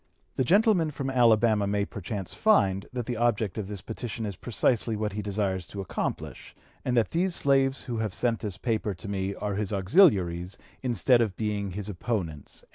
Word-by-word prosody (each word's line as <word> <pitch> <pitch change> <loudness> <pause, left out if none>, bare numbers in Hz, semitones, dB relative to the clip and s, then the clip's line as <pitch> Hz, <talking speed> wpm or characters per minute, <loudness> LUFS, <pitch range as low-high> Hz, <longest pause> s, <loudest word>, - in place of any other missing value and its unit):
The 130 - +1
gentleman 190 - +4
from 135 -2 -4
Alabama 115 -4 +4
may 100 0 0
perchance 100 -2 -6
find, 100 - +2
that 125 -2 -4
the 120 -1 -3
object 110 -3 0
of 100 - -4
this 100 -2 -6
petition 115 0 -5
is 100 -2 -4
precisely 115 +1 0
what 105 0 -2
he 105 - -3
desires 95 -3 -2
to 100 - -8
accomplish; 95 - -4 0.3
and 125 -1 0
that 115 - +2
these 175 +1 +1
slaves 135 -1 +2
who 120 -2 -4
have 110 -2 -1
sent 115 +3 0
this 100 -5 -5
paper 110 -2 -1
to 100 - -9
me 100 0 -2
are 105 -1 -3
his 105 0 -2
auxiliaries 95 - +3 0.2
instead 120 0 +3
of 105 -6 -1
being 105 -3 -2
his 100 +1 -5
opponents." 90 - -4
105 Hz, 185 wpm, -27 LUFS, 100-120 Hz, 0.3 s, gentleman